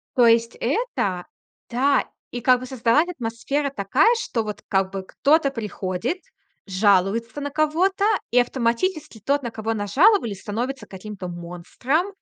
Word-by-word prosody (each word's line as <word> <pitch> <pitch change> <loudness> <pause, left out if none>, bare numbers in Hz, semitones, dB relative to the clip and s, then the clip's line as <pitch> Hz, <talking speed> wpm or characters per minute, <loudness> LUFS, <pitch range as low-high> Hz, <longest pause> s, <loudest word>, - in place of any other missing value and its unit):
То 245 -2 +5
есть 230 0 +3
это? 235 - -1 0.4
Да. 270 +3 +2 0.2
И 245 - -5
как 250 +1 +4
бы 255 - -7
создалась 260 +6 +2
атмосфера 275 0 -2
такая, 265 - +3
что 230 - -2
вот 210 -1 -6
как 190 -1 +1
бы 195 -1 -4
кто-то 290 - +2
приходит, 215 - -3 0.5
жалуется 200 +6 +2
на 285 - -3
кого-то, 335 +7 +1 0.3
и 245 - +5
автоматически 245 - -1
тот, 285 0 +1
на 235 - -4
кого 225 0 -3
нажаловались, 230 - +3
становится 245 +6 -4
каким-то 190 -1 -8
монстром. 180 - -2
235 Hz, 140 wpm, -23 LUFS, 205-285 Hz, 0.5 s, То